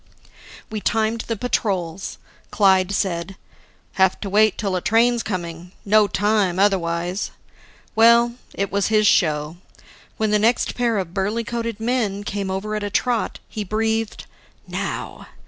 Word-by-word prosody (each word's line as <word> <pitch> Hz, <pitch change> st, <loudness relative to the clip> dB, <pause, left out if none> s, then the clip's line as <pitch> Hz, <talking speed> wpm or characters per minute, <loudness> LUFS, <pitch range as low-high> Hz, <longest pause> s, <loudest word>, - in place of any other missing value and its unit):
We 215 Hz, -1 st, -3 dB
timed 225 Hz, +1 st, 0 dB
the 230 Hz, -, -1 dB
patrols. 195 Hz, -6 st, -2 dB, 0.3 s
Clyde 190 Hz, -2 st, +3 dB
said, 190 Hz, -1 st, -2 dB, 0.7 s
"Have 190 Hz, -1 st, +4 dB
to 200 Hz, -, -4 dB
wait 215 Hz, 0 st, +4 dB
till 195 Hz, -3 st, -1 dB
a 180 Hz, -, -1 dB
train's 235 Hz, +3 st, +3 dB
coming. 175 Hz, -3 st, -5 dB
No 210 Hz, +1 st, +5 dB
time 205 Hz, -2 st, +1 dB
otherwise." 180 Hz, -1 st, 0 dB, 0.7 s
Well, 235 Hz, +1 st, +5 dB, 0.2 s
it 200 Hz, 0 st, -2 dB
was 200 Hz, -1 st, +1 dB
his 215 Hz, -1 st, +3 dB
show. 155 Hz, -4 st, +2 dB, 0.6 s
When 215 Hz, -1 st, 0 dB
the 210 Hz, -, +3 dB
next 230 Hz, +3 st, +2 dB
pair 235 Hz, -3 st, 0 dB
of 180 Hz, -3 st, -3 dB
burly 205 Hz, +4 st, -1 dB
coated 230 Hz, -1 st, -4 dB
men 220 Hz, -4 st, -1 dB
came 200 Hz, -1 st, -3 dB
over 195 Hz, +3 st, -3 dB
at 210 Hz, -, -2 dB
a 205 Hz, -, -3 dB
trot, 235 Hz, +2 st, 0 dB
he 215 Hz, -, -5 dB
breathed, 220 Hz, +2 st, -1 dB, 0.4 s
"Now!" -, -, -5 dB
205 Hz, 145 wpm, -22 LUFS, 190-225 Hz, 0.7 s, No